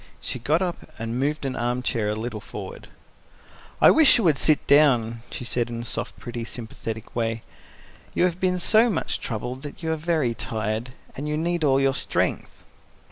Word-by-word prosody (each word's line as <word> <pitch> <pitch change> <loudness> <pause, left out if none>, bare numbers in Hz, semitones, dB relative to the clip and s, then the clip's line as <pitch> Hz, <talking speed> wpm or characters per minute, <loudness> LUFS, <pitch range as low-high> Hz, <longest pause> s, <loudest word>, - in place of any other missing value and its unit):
She 125 - -4
got 155 +9 +1
up 175 -2 -4
and 115 +2 -3
moved 145 +1 -1
an 130 - -2
arm 120 +1 -1
chair 110 -4 0
a 105 - -1
little 110 0 -4
forward. 470 - -8 0.9
"I - - +8
wish 315 -3 +7
you 230 - 0
would 155 -6 +3
sit 155 -2 +3
down," 120 -6 +4
she 125 - -6
said 120 0 -1
in 115 0 -4
a - - -9
soft, - - -4
pretty, 120 -1 -6
sympathetic 110 -1 -7
way. 115 -1 -1 0.7
"You - - +3
have 180 -1 +1
been 185 -1 +1
so 220 +6 +4
much 210 - -1
troubled 125 +3 -4
that 145 +3 -8
you 160 - 0
are - - +1
very 155 -6 0
tired, 110 +2 -3 0.2
and 145 +3 -4
you 150 - 0
need 170 +1 0
all 135 -2 +4
your 135 0 +3
strength." - - -2
130 Hz, 190 wpm, -25 LUFS, 115-160 Hz, 0.9 s, I